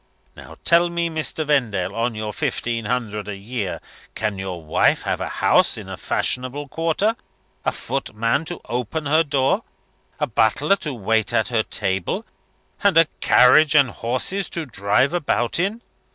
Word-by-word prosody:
Now, - - -12
tell 170 +1 +4
me, 170 -1 -1
Mr. 155 0 -1
Vendale, 120 -11 0
on 115 0 -1
your 110 0 -4
fifteen 115 +1 -2
hundred 105 -3 -2
a 105 - -4
year 100 -1 -4 0.4
can 105 -3 -2
your 90 -3 -5
wife 75 - +2
have - - -2
a - - -3
house - - +3
in - - -8
a - - -6
fashionable 130 +3 -2
quarter, 165 +9 0 0.5
a - - +1
footman 115 +7 -2
to 175 +1 -6
open 125 +6 -3
her 155 +3 +3
door, 140 -3 +1 0.6
a - - +2
butler 120 - +2
to 150 -6 -4
wait 110 0 +1
at 110 - +1
her 115 -3 +2
table, 95 - -2 0.6
and 200 -5 +4
a 165 - +8
carriage 145 +5 +5
and 140 -5 +5
horses 130 - -1
to 165 -2 -3
drive 110 - +1
about 145 -6 0
in? 205 +6 -1
125 Hz, 160 wpm, -22 LUFS, 110-160 Hz, 0.6 s, a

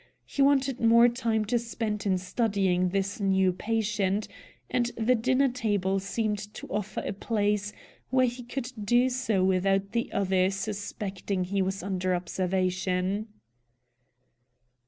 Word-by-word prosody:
He 280 - -2
wanted 275 -2 +3
more 235 +1 +7
time 230 -3 0
to 240 +3 +1
spend 220 -3 -3
in 190 -1 +2
studying 185 -2 +1
this 195 +4 -2
new 190 -2 +2
patient, 210 0 -1 0.4
and 240 -1 +1
the 230 +2 +3
dinner 255 +3 +2
table 205 -6 0
seemed 210 +1 -1 0.2
to - - -7
offer 210 -1 -3
a - - -2
place 205 0 0 0.4
where 255 0 +4
he 245 +1 -3
could 245 +1 -5
do 240 +5 +3
so 245 -7 0
without 195 +1 +2
the 235 0 -1
other 190 -1 +2
suspecting 195 -1 -3
he 195 +2 -1
was 190 0 -2
under 185 -1 0
observation. 185 +2 -1
205 Hz, 135 wpm, -28 LUFS, 190-235 Hz, 0.4 s, more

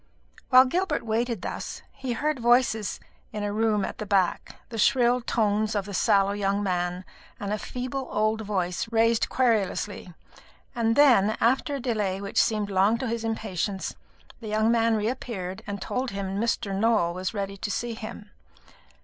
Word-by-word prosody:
While 255 0 +8
Gilbert 340 0 -1
waited 225 -2 -1
thus - - -5
he 265 -3 -4
heard 300 +3 -1
voices 235 -3 +2 0.3
in 210 - -4
a 205 0 -2
room 215 -2 +1
at - - -7
the 215 - -3
back 190 -3 +1
the 225 -2 -5
shrill 245 +1 +3
tones 215 -2 0
of 200 -2 -1
the 205 - -7
sallow 195 +1 +3
young 200 0 0
man 180 -1 -1 0.3
and 200 0 -3
a 210 - -2
feeble 255 +1 -4
old 215 +1 +1
voice 190 -1 -2
raised 230 0 +3
querulously 210 -5 0 0.6
and 230 -1 +1
then, 235 -8 +5
after 265 +4 +2
a - - -3
delay 210 -7 -1
which 200 0 +1
seemed 210 -2 0
long 195 +4 +3
to 260 - -3
his 230 0 -2
impatience, 205 -3 -3 0.4
the 225 - -8
young 215 +1 +2
man 230 -1 +3
reappeared 210 -4 -3
and 200 -1 -4
told 255 +1 -2
him 195 0 -3
Mr. 225 -3 -1
Nowell 205 -5 +2
was 185 +4 -4
ready 195 -1 -3
to 200 - -4
see 240 +3 -2
him. 215 -2 -9
215 Hz, 165 wpm, -26 LUFS, 200-235 Hz, 0.6 s, While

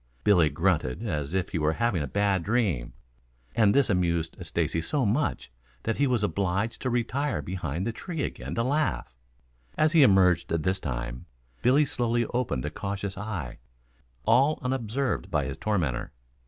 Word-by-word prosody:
Billy 90 -7 +5
grunted 80 -9 0
as 75 +3 -2
if 95 -1 0
he 85 - -2
were 75 +1 +2
having 115 -4 0
a 70 - -2
bad 100 +3 +1
dream, 100 - 0 0.6
and 110 -3 +5
this 140 -2 +4
amused 85 -4 0
Stacy 80 - -1
so 130 - 0
much 120 - 0 0.3
that 115 - -1
he 140 - +3
was 120 -5 +1
obliged 100 +2 -1
to 130 - -1
retire 120 - 0
behind 85 +1 -3
the 115 - 0
tree 160 +5 -4
again - - -5
to 115 - +1
laugh. 145 - 0 0.6
As 155 0 +3
he 165 -2 +6
emerged 95 - +5
this 90 +4 0
time, - - -5 0.3
Billy 135 +5 +4
slowly 120 -2 0
opened 120 - -1
a 75 - -3
cautious 100 +1 -4
eye, 95 - -5 0.7
all 135 +6 +4
unobserved 130 0 -1
by - - 0
his - - -5
tormentor. 85 - -1
100 Hz, 160 wpm, -27 LUFS, 85-120 Hz, 0.7 s, he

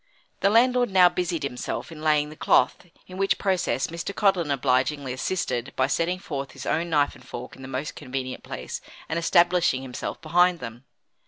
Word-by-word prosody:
The 195 - +3
landlord 245 +2 +4
now 185 -2 +6
busied 175 -3 -2
himself 140 +4 -4
in 155 -2 -9
laying 150 -1 +2
the - - -10
cloth, 180 - +2 0.2
in 185 - -10
which 195 0 +2
process 190 -3 0
Mr. 170 +4 -5
Codlin 190 -6 +2
obligingly 135 0 +1
assisted 130 -3 -2
by 130 - +3
setting 165 +6 0
forth 140 -7 -5
his - - -9
own 170 +2 0
knife 145 -3 +2
and - - -16
fork 125 +1 -8
in - - -14
the 130 - -8
most 135 +3 -4
convenient 130 0 -5
place 65 -1 -6 0.3
and 165 - -1
establishing 170 -5 +3
himself 125 -2 -5
behind 175 +2 +3
them. 120 -2 -9
155 Hz, 180 wpm, -25 LUFS, 135-180 Hz, 0.3 s, now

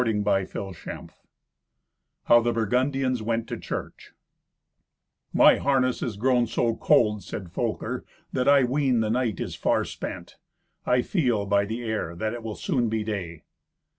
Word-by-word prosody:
Thirty 110 -3 0
First 95 -2 0 0.3
Adventure - - -7 1.1
How 120 - +6
the 120 +1 +1
Burgundians 130 +2 0
Went 115 +1 -1
to - - -2
Church - - -7 1.2
"My - - +6
harness 130 -2 +1
is 110 -5 -3
grown 120 +1 +2
so 115 0 0
cold," 105 -3 +3
said 90 -4 -7
Folker, - - -3 0.3
"that 130 -1 0
I 140 -1 +6
ween 130 -2 +1
the 110 -1 0
night 120 -4 0
is - - -4
far - - +1
spent. - - -7 0.5
I 125 0 +3
feel, 125 - 0
by 100 0 +2
the 115 +4 -4
air, 110 -7 -3
that 110 +5 -2
it 120 - -6
will 110 -2 -5
soon 125 - 0
be 110 -1 -1
day." 90 -7 -5
115 Hz, 155 wpm, -26 LUFS, 105-125 Hz, 1.2 s, How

